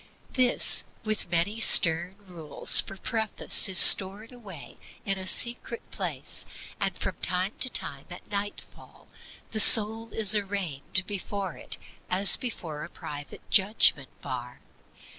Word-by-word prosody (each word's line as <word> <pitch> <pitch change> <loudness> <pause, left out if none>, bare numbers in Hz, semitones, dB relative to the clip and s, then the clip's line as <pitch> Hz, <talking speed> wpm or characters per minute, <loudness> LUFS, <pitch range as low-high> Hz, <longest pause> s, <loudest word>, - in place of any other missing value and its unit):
This, 255 -2 0 0.2
with 215 -4 -6
many 180 +6 -3
stern 175 -3 +3
rules 165 -5 -1
for 195 - -13
preface, 220 -1 -1
is 185 - +3
stored 200 +6 +6
away 200 - -14 0.3
in 195 -1 -4
a 185 - -10
secret 235 +2 -2
place, - - -6 0.4
and - - -5
from - - -6
time 180 +2 -4
to 255 - 0
time, 140 - -6
at 175 - -13
nightfall, 205 0 -10 0.4
the 220 - -5
soul 220 +1 +6
is 215 -2 +5
arraigned 190 -5 -3
before 200 -2 -8
it - - -6 0.3
as 195 +2 +4
before 165 -11 -9
a - - -11
private 145 -1 -13
judgment 195 -9 +1
bar. 125 -1 -10
195 Hz, 130 wpm, -24 LUFS, 170-215 Hz, 0.4 s, stored